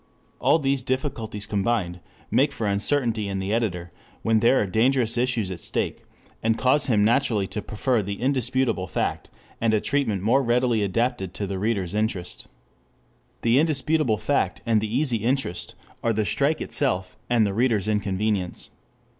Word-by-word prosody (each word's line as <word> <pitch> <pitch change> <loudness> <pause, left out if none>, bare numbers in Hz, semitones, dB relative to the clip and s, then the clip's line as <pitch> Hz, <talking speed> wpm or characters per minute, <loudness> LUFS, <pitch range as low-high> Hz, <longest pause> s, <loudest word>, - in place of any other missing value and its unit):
All - - +4
these 135 -3 0
difficulties 125 -5 -3
combined 100 -3 -1 0.3
make - - +3
for 110 - -3
uncertainty 110 +1 +1
in 100 -1 -3
the 95 +2 -2
editor 90 -7 -1 0.3
when 110 -1 +3
there 120 +4 +4
are - - +1
dangerous 115 +3 +2
issues 120 -5 0
at 90 - -6
stake, - - -3 0.4
and 115 0 +1
cause 130 +4 +2
him 105 -5 +3
naturally 115 -3 +2
to 105 - -5
prefer 115 +3 0
the 100 0 -5
indisputable 125 -5 0
fact - - -2 0.3
and 110 -1 +3
a - - +3
treatment 110 -8 -1
more 125 +6 +4
readily 120 -2 +2
adapted 100 -1 -1
to 100 - -3
the 95 -1 -4
reader's 100 -4 -1
interest. 105 -4 -3 1.0
The 115 +3 +4
indisputable 155 -5 +1
fact 110 +7 0
and 115 -2 +2
the 105 -1 -3
easy 130 -1 +1
interest, 110 -7 -2 0.3
are 115 - +2
the 110 0 0
strike 145 +8 +1
itself 95 -10 -1
and 120 -3 +4
the 100 - -1
reader's 110 -3 +1
inconvenience. 100 -2 -1
110 Hz, 160 wpm, -24 LUFS, 100-130 Hz, 1.0 s, All